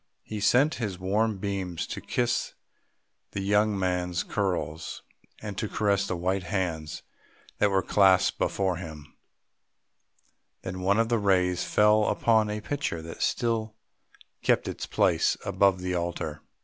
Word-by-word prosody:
He 110 - -6
sent 135 +8 +4
his 100 -5 -2
warm 105 +3 0
beams 95 -3 -3
to - - -6
kiss 120 -1 -1 0.8
the 100 - -2
young 105 +1 +2
man's 90 -2 -1
curls, 90 -5 -3 0.4
and 105 -2 -5
to 110 - -2
caress 100 -2 +1
the 90 - -2
white 95 +3 0
hands 85 -4 -3 0.6
that 105 - +4
were 95 -1 +1
clasped 95 -1 +4
before 95 -3 0
him; 75 -4 -9 1.5
then 95 0 -5
one 100 +2 +2
of 115 0 +2
the 120 -1 +2
rays 90 -3 +2
fell 105 0 +4
upon 110 -1 +2
a 105 0 -3
picture 130 - -3
that 80 0 -9
still 110 -2 0 0.7
kept - - +2
its - - -5
place - - +2
above 95 -2 +2
the 90 0 -2
altar. 85 -3 -3
95 Hz, 140 wpm, -27 LUFS, 90-105 Hz, 1.5 s, sent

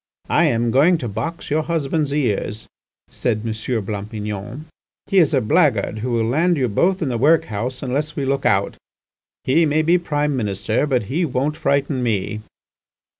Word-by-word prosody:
"I - - +4
am 115 0 +1
going 155 +8 +4
to 125 - -4
box 165 +10 -5
your 155 +2 +2
husband's 155 -2 -1
ears," 110 -6 -1 0.5
said 110 -3 -1
M. 115 - -1 0.3
Blampignon; 105 +5 -5 0.4
"he 195 -2 +3
is 165 - +4
a 135 -4 +2
blackguard 120 - +2
who 125 +4 -3
will 115 -1 +1
land 165 +8 +2
you 130 -3 +1
both 180 - +1
in 145 - -1
the 120 -2 -2
workhouse 130 -4 +1
unless 145 +4 -2
we 140 - -2
look 135 +1 0
out. 100 0 +1 0.7
He 160 +6 +3
may 155 +2 +2
be 175 +3 +3
Prime 150 -3 -1
Minister, 105 +3 -1
but 130 -5 +1
he 140 - -1
won't 140 0 -1
frighten 140 -2 0
me." 110 -2 -1
135 Hz, 170 wpm, -20 LUFS, 110-155 Hz, 0.7 s, I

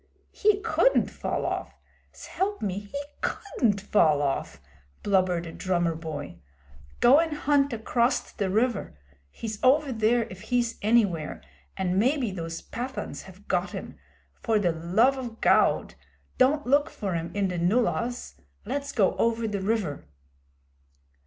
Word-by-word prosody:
'He 420 -1 +2
couldn't - - +2
fall - - -3
off! - - -4 0.3
S'elp 405 +2 -3
me, 200 +1 -3
'e 285 0 -3 0.2
couldn't 230 - 0
fall 155 -7 +3
off,' 135 -1 -2 0.4
blubbered 185 -3 +1
a 165 - -7
drummer 175 -2 0
boy. 150 - -7 0.6
'Go 270 +5 +7
an' 325 -2 0
hunt 285 -2 +2
acrost 235 +2 -1
the 200 -2 0
river. 215 - 0 0.3
He's 215 - -7
over 275 +2 +4
there 230 +1 +2
if 185 0 -10
he's 240 +1 -1
anywhere, 200 - +1 0.3
an' 185 0 0
maybe 255 0 +1
those 165 -2 -6
Pathans 255 +3 -5
have - - -15
got - - -1
'im. - - -7 0.5
For 225 -2 +2
the 185 -5 +2
love 190 +12 +2
o' 250 -2 -4
Gawd - - +3 0.5
don't 285 +4 +3
look 285 +4 +3
for 195 -3 -4
'im 165 0 -3
in 200 -2 +1
the 180 -1 -3
nullahs! 235 +6 0 0.2
Let's 280 +5 -3
go 195 -5 +2
over 230 0 +1
the 205 -2 -3
river.' 190 - -2
220 Hz, 140 wpm, -26 LUFS, 180-255 Hz, 0.6 s, Go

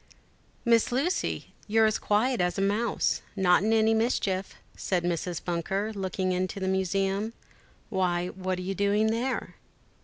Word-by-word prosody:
"MISS 230 -1 +4
Lucy, 290 +10 -1
you're 220 +1 +4
as 215 0 +1
quiet 220 +2 +1
as 180 +1 0
a - - 0
mouse. 210 +3 +1
Not 180 -3 +4
in 215 +2 +1
any 220 0 +4
mischief?" 205 -4 0 0.2
said 180 -3 -1
Mrs. 175 0 -2
Bunker, 195 +5 -1
looking 190 -1 -2
into 185 +2 -1
the 190 - -2
museum; 195 +3 0 0.6
"why, 180 -2 0
what 185 0 -3
are 180 - -5
you 190 +2 -2
doing 205 +3 +2
there?" 250 +3 -2
195 Hz, 150 wpm, -28 LUFS, 185-220 Hz, 0.6 s, MISS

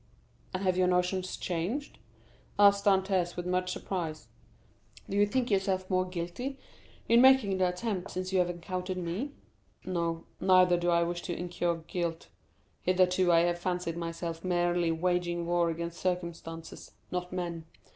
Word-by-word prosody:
"And 185 +1 -3
have 185 -1 +2
your 185 -1 +3
notions 180 +1 0
changed?" 185 - -3 0.6
asked 200 0 +5
Dantès 190 -3 +2
with 175 - -4
much 180 0 0
surprise; 165 -5 -4 0.8
"do 195 - -4
you 205 0 +4
think 250 +1 0
yourself 190 -1 +1
more 185 0 +2
guilty 180 +10 -4 0.5
in 235 +1 +6
making 255 -8 +5
the 185 - +4
attempt 185 0 -3
since 185 +1 -4
you 190 - +4
have 175 -1 +2
encountered 180 +2 -4
me?" 185 +11 -3 0.5
"No; 170 -2 -2
neither 185 -1 +5
do 175 0 0
I 170 0 +4
wish 175 0 -2
to 175 -2 -4
incur 175 -1 -1
guilt. 170 -3 -3 0.5
Hitherto 185 0 +3
I 165 -1 +6
have 175 0 +1
fancied 175 -2 -2
myself 165 0 -4
merely 175 -2 +1
waging 175 0 0
war 170 0 +2
against 170 +1 -4
circumstances, 170 -2 -4 0.2
not 180 0 -3
men. 170 -3 -4
180 Hz, 150 wpm, -30 LUFS, 170-185 Hz, 0.8 s, in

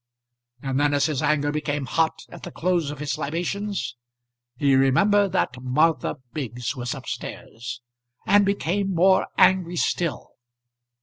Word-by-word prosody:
And 135 0 -1
then 145 0 +2
as 140 -1 +2
his 150 -4 -1
anger 145 -1 +1
became 150 -2 -2
hot 160 +4 0
at - - -11
the - - -7
close 175 -4 0
of 145 - -6
his 140 -3 -3
libations, 180 - -3 0.6
he 140 0 +3
remembered 195 +10 +4
that 125 0 0
Martha 155 +7 +1 0.2
Biggs 125 -3 -4
was 125 -2 -3
up - - -10
stairs, 120 +2 -7 0.4
and 205 0 +5
became 195 -1 0
more 185 +3 +4
angry 180 -2 +4
still. 165 -3 -1
150 Hz, 140 wpm, -24 LUFS, 135-180 Hz, 0.6 s, and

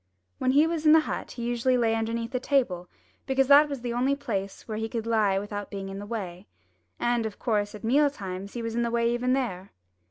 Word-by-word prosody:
When 255 0 +2
he 295 +3 +6
was 325 -1 -1
in 305 - +8
the 320 - +7
hut - - -5
he 240 - -6
usually 240 +2 +1
lay 230 -2 +2
underneath 230 +1 -2
the 250 - -1
table, 240 -11 0 0.4
because 270 0 +3
that 290 +1 +7
was 280 -4 -5
the 240 -1 -3
only 260 +3 +1
place 200 -9 -4
where 215 -1 -3
he 225 0 -3
could 225 -2 -3
lie 215 -4 +2
without 205 0 -4
being 195 -1 -6
in 195 0 -6
the 205 - -7
way. 195 -4 -5 0.5
And, 240 -1 +1
of 220 -2 -5
course, 210 -3 -1
at 210 - -11
meal 285 +6 +4
times 195 -6 -7
he 235 - -4
was 230 0 -3
in 235 - 0
the 235 - 0
way 235 0 +1
even 250 +1 +1
there. 200 -8 -3
230 Hz, 235 wpm, -27 LUFS, 205-255 Hz, 0.5 s, in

